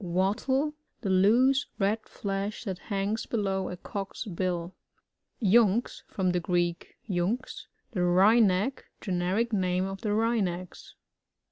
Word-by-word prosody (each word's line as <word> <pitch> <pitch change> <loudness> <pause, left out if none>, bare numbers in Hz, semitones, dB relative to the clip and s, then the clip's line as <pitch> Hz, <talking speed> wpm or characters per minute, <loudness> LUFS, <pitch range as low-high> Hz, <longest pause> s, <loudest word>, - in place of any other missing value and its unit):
Wattle 215 - 0
— - - -47
The 195 - 0
loose, 245 +9 +4
red 210 +2 0
flesh 200 +1 -3
that 190 -5 -4
hangs 200 +2 -1
below 195 -4 -1
a 180 - -6
Cock*s 195 +5 -6
bill. 180 -2 -2 0.7
YuNx. 220 +2 +3
— - - -41
From 185 -2 +1
the 180 - +1
Greek, 175 0 -1
xunx, 195 +6 -2 0.2
the 195 -7 -2
Wryneck. 200 +5 +4
Generic 190 +5 -1
name 185 -2 +1
of 195 0 -6
the 220 - -2
Wrynecks. 205 -5 -1
195 Hz, 130 wpm, -28 LUFS, 180-220 Hz, 0.7 s, loose